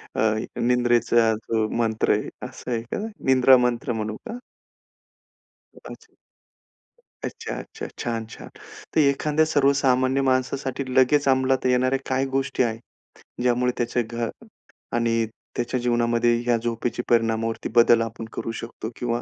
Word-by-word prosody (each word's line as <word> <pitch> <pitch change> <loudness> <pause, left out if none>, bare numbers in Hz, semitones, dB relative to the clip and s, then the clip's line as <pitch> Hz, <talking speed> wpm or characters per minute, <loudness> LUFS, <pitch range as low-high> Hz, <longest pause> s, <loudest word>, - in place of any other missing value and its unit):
अ, - - 0 0.4
निंद्रेचा 120 -1 +3
जो 110 0 -1
मंत्र 110 -2 +1
आहे - - -2 0.2
असं - - -8
आहे 115 -1 0
का? 120 - -5 0.3
निंद्रा 130 0 +6
मंत्र 125 0 0
म्हणू 110 -1 -3
का? 235 +2 -5 1.4
कदाचित. - - -13 1.1
अच्छा, - - -5
अच्छा. 440 0 -7
छान, 115 -1 -2
छान. 110 - -11 0.5
तर - - +4
एखाद्या 150 +2 +2
सर्वसामान्य 135 -3 +2
माणसासाठी 130 +1 -1
लगेच 140 +2 +4
अंमलात 130 0 +2
येणाऱ्या 130 +1 +2
काही 130 +1 +1
गोष्टी 135 -1 +1
आहेत, 115 -1 -5 0.4
ज्यामुळे 125 0 +2
त्याच्या 120 0 0
घर 115 0 -2 0.7
आणि 115 -1 +1 0.3
त्याच्या 120 +1 -1
जीवनामध्ये 120 -1 +2
या 120 -1 +3
झोपेच्या 115 +1 -3
परिणामावरती 115 -1 +1
बदल 120 -1 +6
आपण 115 0 -5
करू 115 - -4
शकतो 115 -1 -7
किंवा 120 0 -2
120 Hz, 130 wpm, -24 LUFS, 115-130 Hz, 1.4 s, निंद्रा